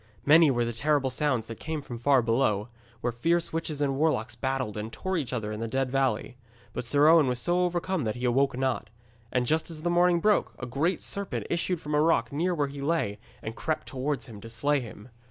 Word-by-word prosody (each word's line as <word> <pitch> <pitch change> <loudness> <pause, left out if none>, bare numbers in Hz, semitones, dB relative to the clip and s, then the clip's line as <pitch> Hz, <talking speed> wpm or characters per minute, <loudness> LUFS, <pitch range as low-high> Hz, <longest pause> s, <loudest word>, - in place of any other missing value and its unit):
Many 160 +1 +7
were 120 -3 +1
the 120 - -3
terrible 140 +2 +1
sounds 130 -4 0
that 115 -1 -8
came 160 -1 -3
from 120 -3 -7
far 135 0 +4
below, 115 -2 +1 0.3
where 120 - 0
fierce 165 +9 0
witches 160 -2 -2
and 135 -2 +1
warlocks 125 -8 +1
battled 130 -2 -2
and 110 +1 -5
tore 190 +8 -3
each 145 -9 -2
other 110 -4 -3
in 105 - -5
the 115 - -2
Dead 130 +2 -1
Valley; 130 -2 0 0.4
but - - -4
Sir 145 +5 +4
Owen 160 -3 +6
was 125 -1 0
so 175 +7 +1
overcome 175 -1 -1
that 110 - -1
he 125 +1 -3
awoke 135 +2 +2
not. 130 -5 -1 0.4
And 125 -1 +1
just 160 +6 +1
as 155 -2 -8
the 175 - +1
morning 175 0 +4
broke, 210 +4 +2
a 120 - -5
great 145 +9 -1
serpent 200 -1 -3
issued 175 0 0
from 150 -1 -5
a 150 - +4
rock 165 0 +2
near 175 +5 0
where 145 -3 +1
he 140 0 -8
lay 140 -9 0 0.2
and 110 +1 -5
crept 155 -1 -2
towards 135 -1 -2
him 110 -5 -11
to 115 - -9
slay 140 +6 +1
him. 115 -1 -10
135 Hz, 225 wpm, -28 LUFS, 120-160 Hz, 0.4 s, Many